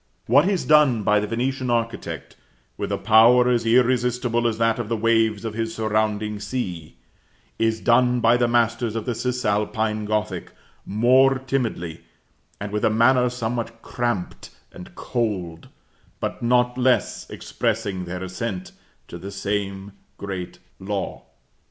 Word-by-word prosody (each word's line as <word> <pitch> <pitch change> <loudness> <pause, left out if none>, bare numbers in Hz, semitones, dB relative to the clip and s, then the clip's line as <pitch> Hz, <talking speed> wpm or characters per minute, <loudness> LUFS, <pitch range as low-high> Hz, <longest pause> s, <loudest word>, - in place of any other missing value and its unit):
What 145 - +4
is 195 -4 -1
done 145 -8 +4
by 105 +1 +3
the 105 - -3
Venetian 130 +3 -2
architect, 115 -1 -3 0.4
with - - -4
a - - 0
power 115 +4 +5
as 120 -2 +1
irresistible 125 0 +2
as 110 -2 -1
that 115 0 +1
of 115 -2 -4
the 115 - 0
waves 115 -1 +1
of 110 - -3
his 115 0 -3
surrounding 105 -1 -1
sea, 90 - -5 0.6
is 115 0 +1
done 125 +2 +3
by 115 0 +4
the 120 0 +2
masters 120 -1 +1
of 115 - -3
the 125 - -1
Cis 125 +2 -3
Alpine 105 +1 0
Gothic, 105 0 -2 0.3
more 130 +5 +4
timidly, 120 -11 -3 0.6
and 100 0 -5
with 105 0 -2
a - - +4
manner 125 +3 +4
somewhat 115 -1 -4
cramped 120 -7 -3 0.2
and 90 - -12
cold, 95 -9 -3 0.5
but - - -4
not 125 +1 +2
less 125 0 +1
expressing 100 -5 -3
their 90 +1 -5
assent 95 0 -5 0.4
to 85 - -9
the 95 - -7
same 100 0 -3 0.3
great 95 -3 -6 0.2
law. 100 0 -4
115 Hz, 145 wpm, -23 LUFS, 105-125 Hz, 0.6 s, power